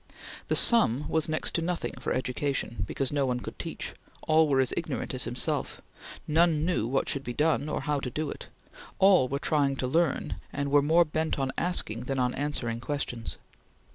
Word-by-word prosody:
The - - +1
sum 150 - +5
was 160 -1 0
next 155 - 0
to 170 - 0
nothing 175 +1 -2
for - - -3
education, 130 -4 -2
because 135 +5 -2
no 140 -2 +1
one 125 -1 -1
could - - -9
teach; - - -5 0.3
all 160 0 +4
were 135 -2 +2
as 130 - +2
ignorant - - -3
as - - -1
himself; - - -2 0.5
none 160 0 +3
knew 170 -11 0
what 135 +3 0
should 140 - -1
be 120 - -5
done, 155 +1 +1
or - - -2
how 150 -1 -1
to 130 - -4
do 150 +4 -3
it; - - -9 0.5
all 190 -8 +5
were 140 - -2
trying 140 -2 +1
to 135 - -3
learn 160 +3 0
and 140 0 -3
were 145 0 +5
more 165 +4 +4
bent 160 +1 -2
on 135 -1 -1
asking 125 -10 +1
than 135 +1 -2
on 125 -1 +1
answering 130 -5 -3
questions. 120 - -4
145 Hz, 195 wpm, -28 LUFS, 130-160 Hz, 0.5 s, sum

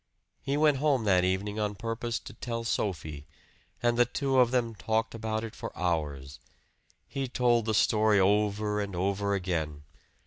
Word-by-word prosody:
He 140 +1 -1
went 150 -2 +4
home 140 -4 +2
that 95 -4 +3
evening 100 +3 -1
on 105 -1 -1
purpose 115 +2 -3
to - - -10
tell 115 -1 -4
Sophie; 80 -9 -3 0.6
and 120 0 +2
the 120 - +6
two 135 +1 0
of 125 -2 +5
them 120 -2 0
talked 110 +3 -1
about 110 -1 -3
it 115 - -6
for - - -6
hours. 75 -6 -2 0.7
He 135 +1 -3
told 120 -2 +2
the 110 -1 0
story 105 -1 +4
over 105 +1 +2
and 100 -2 -4
over 100 +2 0
again. 80 -6 -2
105 Hz, 165 wpm, -29 LUFS, 95-120 Hz, 0.7 s, the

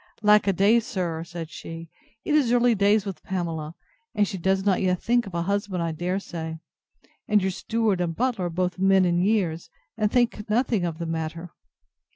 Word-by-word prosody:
Alack 210 0 +5
a 195 - +3
day, 205 +6 +4
sir, 180 -8 -3
said 170 -1 -8
she, 165 0 -8 0.4
it 300 - 0
is 285 -6 +3
early 245 0 +4
days 205 0 +3
with 190 -6 -6
Pamela; 165 -4 -4 0.4
and 205 -1 +2
she 190 - -5
does 190 +2 +1
not 195 -2 +2
yet 180 -2 +1
think 240 -1 +1
of 185 - -8
a 170 - 0
husband, 200 -2 -1
I 165 - -1
dare 175 +4 -2
say: 160 -4 -6 0.7
and 210 -1 +4
your 190 -1 -1
steward 215 -1 0
and 165 -2 -2
butler 240 -5 0
are - - -1
both 180 +2 -2
men 190 0 +4
in 175 0 +2
years, 185 -5 0 0.3
and 215 -1 0
think 235 -4 0
nothing 225 -4 +1
of 165 -2 -3
the 170 - -4
matter. 165 +1 -4
190 Hz, 195 wpm, -25 LUFS, 170-210 Hz, 0.7 s, Alack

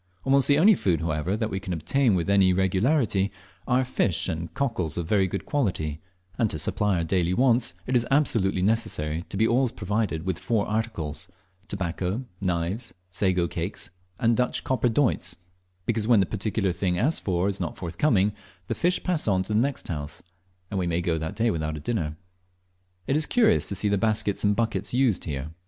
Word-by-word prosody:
Almost 135 0 +3
the 145 - +5
only 200 +8 +7
food, 90 - 0
however, 80 +4 -1
that 110 0 -2
we 95 - -2
can 95 -2 -4
obtain 110 - +2
with 85 -2 -1
any 100 -2 +4
regularity, 100 - +1 0.4
are 130 +1 +2
fish 110 -8 0
and 85 -2 -4
cockles 95 - -1
of 85 - -2
very 95 +2 +2
good 100 +2 -4
quality, 80 - -1 0.4
and 115 -3 +3
to 80 - -3
supply 100 +5 +1
our 85 - 0
daily 90 +1 +1
wants 125 -1 +2
it 130 - -1
is 120 -1 +2
absolutely 110 -10 +2
necessary 85 -7 0
to - - -4
be 110 +2 +3
always 125 +1 +2
provided 105 -6 -2
with 95 -3 -2
four 110 -3 0
articles 85 -8 -3 0.4
tobacco, 95 +5 -3 0.2
knives, 90 +4 -2 0.2
sago 90 -2 +1
cakes, - - -5 0.3
and 115 -2 +3
Dutch 125 +1 0
copper 125 -2 +1
doits 110 -8 +1 0.5
because 110 -2 0
when 115 -3 +6
the 95 - +3
particular 105 -1 -1
thing 90 0 -1
asked 145 - +1
for 90 -1 0
is 100 -1 -1
not 85 -4 -4
forthcoming, 100 - +1 0.3
the - - -2
fish 180 +1 +1
pass 175 -8 0
on 95 -2 +2
to 105 - -2
the 105 - +3
next 135 +3 -1
house, 75 -2 -5 0.5
and 100 - -1
we 90 - 0
may 85 0 0
go 85 -2 0
that 80 0 -4
day 115 0 +2
without 80 -2 -2
a - - -5
dinner. 80 -3 -2 0.9
It 135 - 0
is 155 0 +3
curious 220 -3 +3
to 100 - -2
see 105 - -1
the 100 -1 +1
baskets 105 -2 0
and 105 0 +3
buckets 110 -1 -1
used 125 -8 +2
here. 70 -1 -4
100 Hz, 195 wpm, -26 LUFS, 85-115 Hz, 0.9 s, only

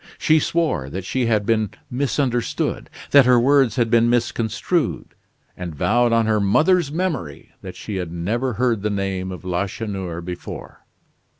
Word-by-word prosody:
She 155 0 +3
swore 155 - -1
that 95 +5 -6
she 125 +3 -1
had 105 -3 +1
been 110 -2 +1 0.2
misunderstood, 125 -2 -1 0.2
that 140 -3 +7
her 125 -1 +6
words 135 0 +3
had 120 -3 +1
been 115 0 +4
misconstrued; 120 -2 -1 0.4
and 90 -4 -6
vowed 120 +10 +2
on 115 -1 +3
her 110 -1 +2
mother's 155 - +3
memory, 155 - -3
that - - -8
she 105 -3 -5
had 90 -3 -4
never 115 +10 -2
heard 115 -1 0
the 105 - -1
name 95 -2 -2
of 90 0 -9
Lacheneur 95 -1 -3
before. 90 0 -8
115 Hz, 155 wpm, -21 LUFS, 95-125 Hz, 0.4 s, that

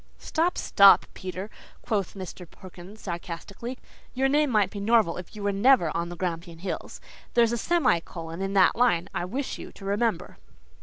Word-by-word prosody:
"Stop, 335 +3 -1
stop, 200 0 +6
Peter," 185 +3 -6 0.3
quoth 205 -6 -2
Mr. 185 -2 -8
Perkins, 185 +3 -13
sarcastically, 185 +7 -6 0.4
"your 265 +1 +2
name 295 +1 +2
might 210 -5 +2
be 205 - -6
Norval 215 -4 +3
if 180 +4 -9
you 210 - -7
were 200 - +1
never 200 - +3
on 170 +1 -2
the 175 - -7
Grampian 170 -1 -4
Hills. 185 +3 -6 0.4
There's 235 -1 +4
a - - 0
semi 330 - +2
colon 165 +1 -8
in 195 0 -2
that 190 -2 +5
line, 230 -8 +2
I 175 - -2
wish 260 +9 -4
you - - -9
to 195 - -12
remember." 205 -1 -1
195 Hz, 175 wpm, -26 LUFS, 175-235 Hz, 0.4 s, stop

